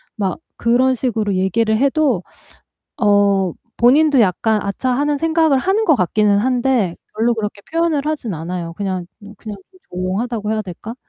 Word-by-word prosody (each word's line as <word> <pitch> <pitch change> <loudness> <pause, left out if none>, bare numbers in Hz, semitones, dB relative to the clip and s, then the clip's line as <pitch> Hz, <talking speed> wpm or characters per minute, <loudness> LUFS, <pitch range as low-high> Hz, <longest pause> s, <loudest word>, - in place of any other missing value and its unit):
막 195 - -2 0.2
그런 255 +2 +2
식으로 220 -5 -1
얘기를 220 +4 +1
해도 275 - +1 0.7
어 200 - +2 0.2
본인도 280 +3 +4
약간 215 +1 +2
'아차.' 225 +6 -2
하는 290 +3 0
생각을 320 -2 +2
하는 390 +8 +1
것 315 -7 +4
같기는 205 +1 +2
한데 245 -5 +1 0.2
별로 230 +2 +2
그렇게 210 -2 -5
표현을 325 -3 0
하진 295 -9 -3
않아요. 165 +1 -5
그냥 185 -1 -3 0.2
음 205 +1 -11
그냥 210 -3 -8
좀 370 - -22
조용하다고 210 +5 -2
해야 220 0 0
될까? 205 +4 -8
220 Hz, 325 characters per minute, -18 LUFS, 200-265 Hz, 0.7 s, 본인도